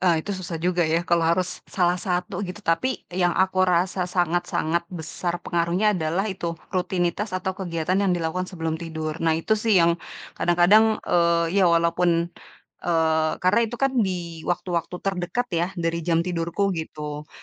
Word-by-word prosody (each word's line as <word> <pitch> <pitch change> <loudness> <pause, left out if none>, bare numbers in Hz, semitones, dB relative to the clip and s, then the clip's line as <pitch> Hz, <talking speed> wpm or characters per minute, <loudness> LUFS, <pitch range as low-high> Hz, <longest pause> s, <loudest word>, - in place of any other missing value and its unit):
eee, 175 -3 +3
itu 205 - -3
susah 185 -3 -5
juga 175 +2 0
ya, 165 +2 +1
kalau 170 0 +2
harus, 180 +1 0
salah 180 -1 +1
satu, 180 0 -2
gitu. 200 +1 -6
Tapi, 245 +11 0
yang 175 -1 +1
aku 185 0 +2
rasa 180 +1 +1
sangat-sangat 175 -1 0
besar 175 +1 -4
pengaruhnya 175 +5 +1
adalah, 175 +2 -1
itu, 175 -5 -3 0.2
rutinitas 185 +2 -1
atau 190 +1 -2
kegiatan 180 0 -1
yang 195 -2 +2
dilakukan 175 +2 -2
sebelum 165 -2 -3
tidur. 160 -1 -4
Nah, 160 -1 +2
itu 165 +6 -1
sih 215 -1 +3
yang 170 0 +1 0.3
kadang-kadang, 205 +6 +4
eee, 170 +2 +2
ya 180 - +5
walaupun, 170 0 +2 0.5
eee, 160 -2 +2
karena 205 +6 +4
itu 240 - -6
kan 270 +1 +1
di 175 -5 -2
waktu-waktu 175 -1 -2
terdekat 195 +6 -1
ya, 170 +1 +1
dari 170 -1 -1
jam 165 0 +1
tidurku, 180 +3 -1
gitu. 150 -2 -6
175 Hz, 160 wpm, -24 LUFS, 165-185 Hz, 0.5 s, ya